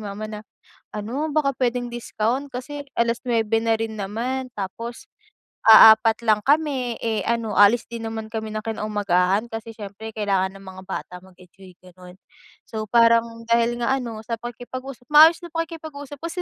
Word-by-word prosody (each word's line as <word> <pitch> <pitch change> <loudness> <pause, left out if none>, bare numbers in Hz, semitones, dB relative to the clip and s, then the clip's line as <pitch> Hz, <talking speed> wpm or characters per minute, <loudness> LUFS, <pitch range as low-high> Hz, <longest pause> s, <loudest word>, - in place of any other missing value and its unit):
mama 200 +2 -6
na, 210 -1 -7 0.6
"Ano, 255 +9 -3
baka 280 -3 +1
puwedeng 245 -1 -1
discount 240 +3 -2
kasi 285 +3 -6 0.2
alas-nuebe 230 -2 +1
na 225 -1 +2
rin 225 -1 -3
naman 245 +6 -3
tapos 230 +4 -7 0.6
aapat 220 +1 +8
lang 215 -2 +3
kami, 275 -4 +1
eh, 220 -1 0
ano 230 -2 -1
aalis 210 +3 +5
din 235 -1 -8
naman 225 -1 -5
kami 220 -1 -4
ng 215 +1 -5
kinaumagahan 205 -2 0
kasi 225 0 -6
siyempre 210 +1 -8
kailangan 195 -3 0
ng 195 - -15
mga 190 0 -10
bata 185 - -5
mag-enjoy," 185 0 -17
gano'n. 180 0 -15 0.5
So 220 -1 -5
parang 230 0 +3
dahil 235 +1 +2
nga 235 +3 +1
ano, 235 -4 -6
sa 230 0 -3
pakikipag-usap, 245 +2 -8
maayos 315 +3 +8
na 340 - -12
pakikipag-usap. 315 -4 -6
Kasi 335 +2 -4
230 Hz, 155 wpm, -23 LUFS, 210-250 Hz, 0.6 s, aapat